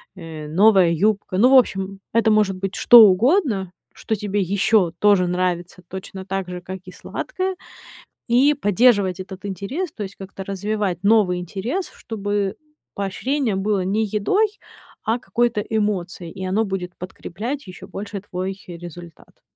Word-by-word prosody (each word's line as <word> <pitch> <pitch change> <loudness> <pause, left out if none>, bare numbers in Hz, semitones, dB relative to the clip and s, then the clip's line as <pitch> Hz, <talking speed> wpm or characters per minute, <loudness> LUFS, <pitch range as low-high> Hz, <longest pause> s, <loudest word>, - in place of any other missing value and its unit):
э, 160 -4 -8
новая 190 +1 +5
юбка. 195 +2 0
Ну, 240 +6 +6
в 270 - +8
общем, 195 -5 +1
это 230 -1 +3
может 210 -3 +3
быть 195 +1 -4
что 235 -2 +9
угодно, 215 - +2 0.2
что 220 - -2
тебе 205 -1 -2
ещё 195 0 +2
тоже 200 -3 +4
нравится 180 0 -2
точно 190 +1 -8
так 195 -1 -3
же, 180 0 -6
как 190 +1 -7
и 185 - -10
сладкое, 380 - -4 0.7
и 260 +5 +4
поддерживать 205 -6 +3
этот 185 0 -9
интерес, 220 - -4
то 215 - -7
есть 190 -1 -7
как-то 195 0 -8
развивать 200 -1 -2
новый 200 -4 +3
интерес, 215 - -4
чтобы 205 -2 -3 0.4
поощрение 225 +5 -1
было 195 -1 0
не 205 +4 +1
едой, 215 - +2 0.6
а 225 +2 0
какой-то 240 -2 0
эмоцией, 200 -5 -2
и 190 -1 -7
оно 195 +4 +1
будет 185 -3 -5
подкреплять 215 - -6
ещё 185 - -10
больше 200 0 -6
твой 190 0 -4
результат. 175 -1 -11
195 Hz, 145 wpm, -21 LUFS, 185-220 Hz, 0.7 s, что